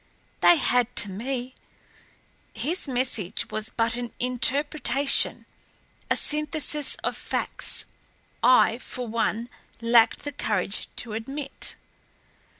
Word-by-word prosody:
They 350 - +7
had 250 -3 +1
to 205 - +5
me. 250 +5 -4 1.0
His 335 +2 -2
message 245 -7 -1
was 215 +1 0
but 230 0 0
an 240 -2 -5
interpretation, 275 +2 +2 0.6
a - - +3
synthesis 300 -1 +1
of - - -1
facts - - -3 0.6
I, 250 -2 +5
for 250 -1 -7
one, 230 +1 -1 0.3
lacked 230 0 +3
the 290 - -4
courage 210 -6 -2
to 230 -3 -4
admit." 270 +6 -3
245 Hz, 105 wpm, -25 LUFS, 230-280 Hz, 1.0 s, They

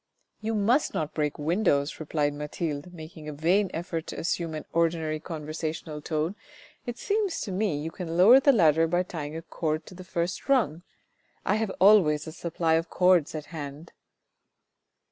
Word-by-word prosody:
"You 220 +1 -1
must 230 +8 +2
not 155 -1 -2
break 150 -2 -1
the 150 - -7
windows," 155 -4 +1
replied 150 -2 0
Mathilde 150 +2 -4
making 160 -2 -9
a - - -5
vain 180 +7 +2
effort 165 -1 -4
to - - -6
assume 165 -1 -2
an 155 - -6
ordinary 165 -2 +1
conversational 155 -1 -5
tone; 155 +5 -2 0.5
"it 240 0 -4
seems 405 -4 -1
to 205 - -4
me 190 -4 0
you 155 +3 -4
can 170 -1 -5
lower 220 +9 +8
the 280 +1 +5
ladder 165 - +4
by 175 +2 +1
tying 155 -4 -6
a 165 - -7
cord 155 -1 -2
to - - -12
the 185 +1 -10
first 175 +5 -3
rung. 225 - +2 0.6
I 205 - +2
have 220 -1 -1
always 180 -7 +5
a 160 - -6
supply 165 0 -1
of 165 +1 +1
cords 180 -4 +3
at 155 -1 -5
hand." 145 +1 -7
165 Hz, 175 wpm, -27 LUFS, 155-185 Hz, 0.6 s, lower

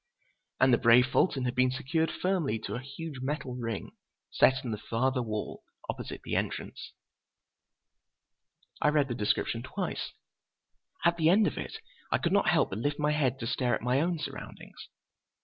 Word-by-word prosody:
And 130 -1 +5
the 120 - +5
brave 125 0 +6
Fulton 130 0 +1
had 120 - 0
been 130 0 +3
secured 150 +5 0
firmly 180 - 0
to - - -4
a - - -2
huge 140 +1 -7
metal 140 -1 -3
ring 115 -4 -4 0.4
set 130 0 +4
in 120 - -2
the 105 - -3
farther 130 +4 0
wall, 110 -3 -4 0.3
opposite - - -8
the - - -3
entrance. - - -3 1.9
I - - +3
read 150 -2 +2
the - - -1
description 115 +1 0
twice. 180 +9 -4 0.9
At 170 0 +4
the 160 -1 +4
end 205 +4 +5
of - - -1
it 440 - -5 0.3
I - - +4
could 170 - 0
not 200 -3 +4
help 170 -2 +3
but 95 - -3
lift 145 +5 -1
my 150 0 +1
head 135 -4 +1
to - - -2
stare 125 0 +1
at - - -7
my 125 +3 +2
own 170 +1 0
surroundings. 150 - -8
130 Hz, 175 wpm, -30 LUFS, 120-160 Hz, 1.9 s, brave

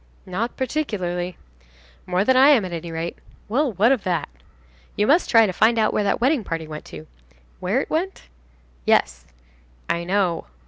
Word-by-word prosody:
"Not 205 +6 -3
particularly." 185 - -3 0.7
"More 180 +2 +1
than 260 - +4
I 265 +3 +7
am, 250 -9 +5
at 180 - -6
any 170 0 -5
rate." 165 +1 -5 0.3
"Well, 265 +5 +1
what 215 +6 +3
of 260 -6 +1
that?" 175 -5 -1 0.7
"You 210 - +1
must 320 +10 +3
try 225 -2 +6
to 190 - -2
find 230 +5 +3
out 215 -1 +2
where 210 - +1
that - - +1
wedding 260 0 +2
party 165 -3 -4
went 150 -1 -8
to." 80 -1 -10 0.5
"Where 200 +9 0
it - - -7
went?" 360 +5 -2 0.6
"Yes." 60 +1 +1 0.6
"I 170 0 -1
know." 180 -2 0
200 Hz, 175 wpm, -22 LUFS, 170-250 Hz, 0.7 s, I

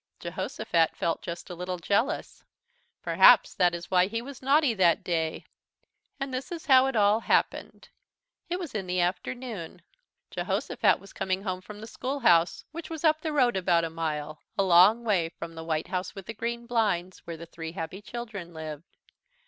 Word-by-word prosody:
Jehosophat 165 -2 -1
felt 165 - -1
just 170 +1 -7
a - - -4
little 180 +1 -4
jealous. 215 - -1 0.6
Perhaps - - +6
that 175 -1 +2
is 170 0 -8
why 180 0 +4
he 230 +3 -3
was 270 +3 -9
naughty 275 -1 +3
that 180 -5 +3
day. 160 -2 -2 0.7
And 270 -1 -4
this 255 +4 -4
is 335 -2 -6
how 265 -2 +6
it 270 - -2
all 210 0 +4
happened: - - 0 0.6
It 355 - -1
was 350 -5 -6
in 195 -4 -3
the 180 0 -1
afternoon. 190 +1 -3 0.5
Jehosophat - - +1
was 195 - -15
coming 190 +1 -2
home 185 -2 -3
from 205 +2 -11
the - - -7
schoolhouse, 230 -9 +1
which 325 +1 -7
was 320 -1 -6
up 310 -1 +3
the 315 - -2
road 255 -6 +3
about 175 -3 +2
a 165 - -3
mile, 155 -2 -4 0.2
a 195 - +3
long 190 +6 +6
way 190 -7 +1
from 165 0 -8
the 160 0 -8
White 160 -1 -2
House 185 +1 -3
with 195 -2 -8
the 230 - -6
Green 235 +2 -4
Blinds 205 -7 0
where 165 -1 -5
the 170 - -9
three 165 -1 -8
happy 180 +2 -6
children 205 -6 -7
lived. 155 0 -8
190 Hz, 180 wpm, -27 LUFS, 170-240 Hz, 0.7 s, Perhaps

